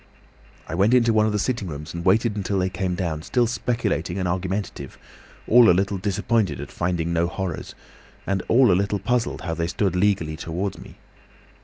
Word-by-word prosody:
"I - - -6
went 100 +8 +3
into 115 -2 +4
one 110 0 +3
of - - 0
the 105 - 0
sitting 115 -1 -1
rooms 75 -1 -7
and 85 0 -5
waited 105 +4 +2
until 100 -1 -2
they 95 0 0
came 90 +1 -2
down, 85 -4 -3
still 120 +8 +1
speculating 115 -7 -2
and 90 -2 -1
argumentative, 90 -5 -3 0.5
all 120 0 +7
a 90 - +5
little 100 0 0
disappointed 100 - 0
at - - -7
finding 85 -1 -1
no 85 0 +1
'horrors,' 90 -2 -5 0.5
and 95 -1 -1
all 120 -2 +5
a - - +5
little 100 +3 +1
puzzled 125 +3 -1
how 85 - -3
they 85 0 -2
stood 95 +1 -1
legally 90 -5 +1
towards 85 +5 -4
me. - - -13
95 Hz, 190 wpm, -23 LUFS, 85-105 Hz, 0.5 s, all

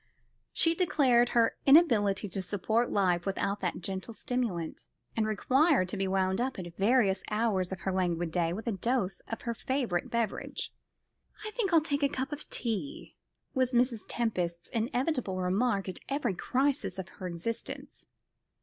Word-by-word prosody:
She 330 - +4
declared 265 -9 +3
her 230 -1 +2
inability 225 - +5
to 190 +2 -3
support 220 +5 0
life 180 -3 +2
without 200 +1 -1
that 180 -2 -2
gentle 195 +5 -5
stimulant, 220 -12 -3 0.3
and 220 -1 +1
required 260 - +3
to - - -3
be 195 0 0
wound 190 +1 +1
up 260 +2 -1
at 175 -2 -7
various 200 -2 +3
hours 210 -4 0
of 190 - -5
her 190 - -1
languid 175 -3 0
day 170 -1 +1
with 205 +6 -5
a 235 - 0
dose 195 -2 -1
of 225 - -5
her 235 - -1
favourite 235 -7 -1
beverage. 230 -3 -2 0.7
"I 430 - -4
think 425 -4 -1
I'll 330 -2 +6
take 290 -2 -1
a 280 - +3
cup 265 0 -3
of 295 0 -6
tea," 280 +8 -3 0.4
was 255 -1 +1
Mrs. 240 -2 +2
Tempest's 180 -7 -2
inevitable 245 - -1
remark 195 +3 +1
at 185 - -5
every 275 -7 0
crisis 270 +9 0
of 190 -1 -5
her 185 - -7
existence. 180 +7 -5
225 Hz, 160 wpm, -30 LUFS, 190-260 Hz, 0.7 s, I'll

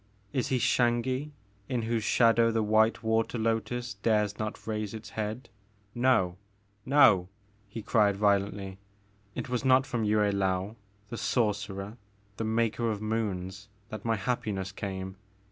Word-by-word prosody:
Is 130 -3 0
he 130 - +1
Xangi 125 +4 +1 0.4
in 125 -3 -1
whose 115 -1 -1
shadow 115 0 +4
the 115 -1 +1
white 110 +1 +3
water 110 +2 +1
lotus 115 +2 -1
dares 105 -2 +1
not 110 0 -4
raise 110 -1 -3
its 110 0 -9
head? 110 +3 -4 0.5
No! 120 -8 +2 0.5
No! 115 -10 +5 0.2
*' 105 0 -35
he 110 +1 -7
cried 105 -3 +3
violently, 100 -1 0 0.6
it - - -4
was 125 -1 -2
not 130 0 +5
from 120 -5 -2
Yue 105 0 +2
Laou, 100 -1 0 0.3
the 115 - -5
sor 105 +1 +1
cerer, 100 +2 -7 0.4
the - - -2
Maker 115 +1 0
of 105 -2 -2
Moons, 105 -2 -3 0.2
that 110 - -7
my 115 -1 +1
happiness 100 -3 -2
came 95 -1 -5
110 Hz, 145 wpm, -29 LUFS, 100-115 Hz, 0.6 s, No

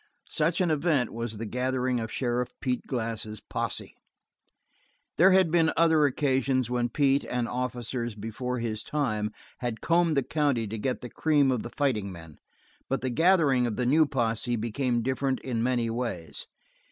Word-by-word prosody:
Such 165 +4 +1
an 175 -3 +2
event 150 -5 +1
was 115 -1 -4
the 115 - -4
gathering 125 +2 0
of 110 -1 -4
Sheriff 125 -1 -1
Pete 125 -2 -2
Glass' 110 -4 -3
posse. - - -3 1.3
There 190 +3 +7
had 185 -3 +4
been 165 -1 +4
other 160 -3 +5
occasions 130 -2 +1
when 120 -1 0
Pete 140 +2 +2
and 125 -1 -2
officers 120 -2 -3
before 115 +4 -4
his 110 -2 -3
time 110 -8 -1 0.3
had 120 -3 -3
combed 165 -2 +2
the 140 - +3
county 140 -5 0
to 110 +1 -5
get 130 +4 -2
the 125 - -7
cream 145 -4 +3
of 125 -4 0
the - - -6
fighting 115 -8 -1
men, 80 -4 -12 0.5
but 135 - 0
the 130 - -1
gathering 155 -5 +4
of 110 - -3
the 125 - -1
new 155 +5 +4
posse 120 -2 0
became 120 +2 -1
different 130 +1 0
in 120 -4 -2
many 120 -1 +1
ways. 115 - -4
125 Hz, 165 wpm, -28 LUFS, 115-140 Hz, 1.3 s, There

